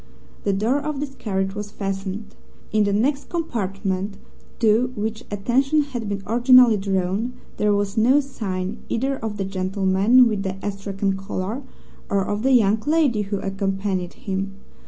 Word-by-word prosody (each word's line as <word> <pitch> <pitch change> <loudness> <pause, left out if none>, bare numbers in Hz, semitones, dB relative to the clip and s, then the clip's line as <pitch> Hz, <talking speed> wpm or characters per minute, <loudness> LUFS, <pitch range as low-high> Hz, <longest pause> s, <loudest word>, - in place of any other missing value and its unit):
The - - +3
door 225 +8 +1
of 295 -1 -3
this 285 -1 -4
carriage 195 -5 -2
was 205 0 -5
fastened. 195 +1 -4 0.4
In 215 -1 +3
the 200 - +1
next 270 +8 0
compartment, 195 - -2 0.4
to 230 +2 +3
which 220 +1 -3
attention 265 +9 +2
had 240 -7 -5
been 200 -1 -3
originally 245 0 +6
drawn, 195 +4 -1 0.2
there 210 - +2
was 200 +1 -1
no 255 +6 +5
sign 210 -7 -4
either 270 +4 0
of 220 -3 -4
the 195 - -2
gentleman 195 +5 +3
with 210 -3 -1
the 190 -1 -3
astrakhan 195 -1 -2
collar 195 +5 -4 0.5
or 195 -1 +1
of 205 +1 -2
the 265 +2 +3
young 215 -3 +4
lady 295 -9 +3
who 200 0 -2
accompanied 195 -2 -2
him. 195 0 -4
205 Hz, 155 wpm, -23 LUFS, 195-245 Hz, 0.5 s, originally